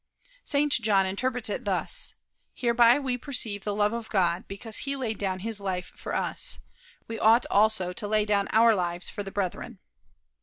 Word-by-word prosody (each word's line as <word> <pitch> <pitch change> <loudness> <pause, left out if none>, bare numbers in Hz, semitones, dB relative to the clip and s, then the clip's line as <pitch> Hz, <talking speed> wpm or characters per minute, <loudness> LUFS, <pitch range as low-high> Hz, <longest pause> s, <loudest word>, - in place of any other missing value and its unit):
St. 290 0 +2
John 210 -5 +3
interprets 245 +5 -1
this 205 - -1
thus: 205 - -1 0.4
Hereby 235 0 +4
we 260 -3 -2
perceive 225 -7 -3
the 205 -1 -2
love 210 +1 +2
of 230 -1 -5
God, 175 -3 +1
because 215 +2 -3
he 275 0 -3
laid 235 -6 -3
down 185 -2 -2
his 220 0 -4
life 185 -2 -4
for - - -5
us. - - -1 0.5
We 225 - -5
ought 230 +2 +5
also 205 -3 +3
to 205 +3 -2
lay 215 0 +2
down 205 -1 +1
our 225 +1 +6
lives 175 -2 -2
for - - -5
the 195 - -6
brethren. 195 -2 -4
215 Hz, 180 wpm, -27 LUFS, 195-235 Hz, 0.5 s, our